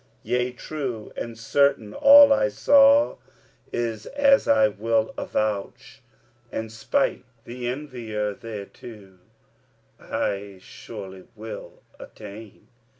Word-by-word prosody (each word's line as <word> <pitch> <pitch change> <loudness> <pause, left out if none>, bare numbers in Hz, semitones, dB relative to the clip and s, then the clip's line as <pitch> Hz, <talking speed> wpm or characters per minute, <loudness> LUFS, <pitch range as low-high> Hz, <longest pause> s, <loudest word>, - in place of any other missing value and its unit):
Yea, 125 0 -1
true 125 -4 -6
and 115 -1 -6
certain 115 -2 +1
all 285 0 +8
I - - +2
saw 285 - +4 0.5
is, 115 -3 -3
as 280 -1 +3
I 110 -1 +5
will 110 +1 -1
avouch, 105 -2 -4 0.5
And 110 -1 -5
'spite 110 0 -1 0.2
the 120 +1 -7
envier, 120 -6 -4
thereto 105 -2 -11 0.8
I 100 -1 -4
surely 95 -2 -11
will 110 +1 -10 0.2
attain. 105 0 -12
115 Hz, 95 wpm, -24 LUFS, 105-135 Hz, 0.8 s, all